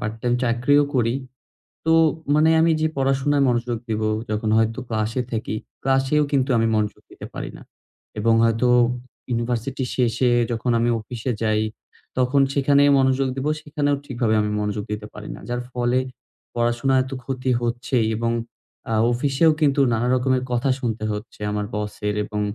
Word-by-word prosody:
Part 105 +1 -3
time 120 0 +1
চাকরিও 125 +5 +3
করি। 120 -1 +2 0.7
তো 160 - +3 0.4
মানে 155 +1 +4
আমি 165 0 +4
যে 155 - +3
পড়াশোনায় 135 +1 +2
মনোযোগ 120 -1 0
দিবো, 110 0 0 0.2
যখন 110 0 -1
হয়তো 115 0 +1
ক্লাসে 110 +3 -1
থাকি, 110 -1 -3 0.3
ক্লাসেও 135 +3 +2
কিন্তু 135 -1 +1
আমি 115 0 +2
মনোযোগ 105 -1 -1
দিতে - - -10
পারি - - -5
না। - - -14 0.6
এবং 115 +2 +3
হয়তো 115 +2 +2 0.6
ইউনিভার্সিটি 120 +2 -2
শেষে 125 0 +2 0.2
যখন 120 +1 -1
আমি 120 +1 +2
অফিসে 120 +3 -4
যাই, 110 0 +2 0.6
তখন 130 +2 +3
সেখানে 140 0 +3 0.2
মনোযোগ 130 0 +2
দিব। 135 +1 -3 0.2
সেখানেও 145 -2 0
ঠিকভাবে 120 -4 0
আমি 105 0 -1
মনোযোগ 105 0 -2
দিতে 105 0 -4
পারি 105 - -9
না। - - -12
যার 120 0 -2
ফলে 125 +1 +1 0.6
পড়াশোনা 120 +3 +1
এত 130 - -10
ক্ষতি 130 0 -3
হচ্ছে 120 +2 -1 0.2
এবং 115 0 0 0.6
আ - - +1 0.2
অফিসেও 140 +6 +3
কিন্তু 140 -1 +3
নানা 115 +2 0
রকমের 130 0 +1
কথা 120 +3 +1
শুনতে 110 -3 -3
হচ্ছে 105 +1 -7
আমার 105 0 -2
বসের। 105 0 -3
এবং 105 0 -3
120 Hz, 155 wpm, -22 LUFS, 110-135 Hz, 0.7 s, মানে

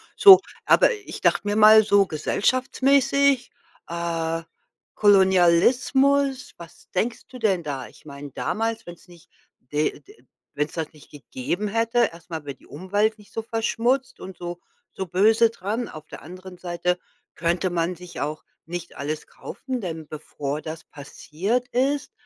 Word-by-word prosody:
So, 390 -2 +10 0.3
aber - - +5
ich 415 -3 -9
dachte - - +3
mir 205 - 0
mal 215 0 +8
so 200 -1 +4
gesellschaftsmäßig, 265 - +1 0.4
äh, 165 -1 -3 0.5
Kolonialismus, 240 +9 +3
was 170 0 -14
denkst 225 +5 -2
du 255 - -11
denn 195 -6 +1
da? 135 -4 -5
Ich - - -20
meine 140 -1 -9
damals, 225 - -2
wenn's 175 +1 -12
nicht, 175 -1 -18 0.3
d 150 +4 -1
äh, 415 +4 -16 0.3
wenn's 150 +1 -2
das 160 -2 -4
nicht 150 - -18
gegeben 145 +7 -4
hätte, 230 +3 +1
erst 170 +1 -16
mal 160 -3 -6
wäre 140 - -5
die - - -22
Umwelt 205 +7 -1
nicht 210 - -19
so 225 - -3
verschmutzt 235 +3 -1
und 185 -2 -9
so 175 0 -6 0.3
so 190 - -5
böse 220 +6 +4
dran. 225 +3 -4
Auf 155 0 -10
der - - -10
anderen 185 +2 -11
Seite 180 0 -2 0.4
könnte 175 +2 0
man 175 +1 -1
sich 180 0 -9
auch 150 +1 -4 0.2
nicht 175 0 -7
alles 150 +2 -4
kaufen, 255 -3 -6
denn 160 -4 -6
bevor 150 -1 -5
das 160 0 -7
passiert 180 - -4
ist, 275 +3 0
185 Hz, 150 wpm, -24 LUFS, 165-230 Hz, 0.5 s, So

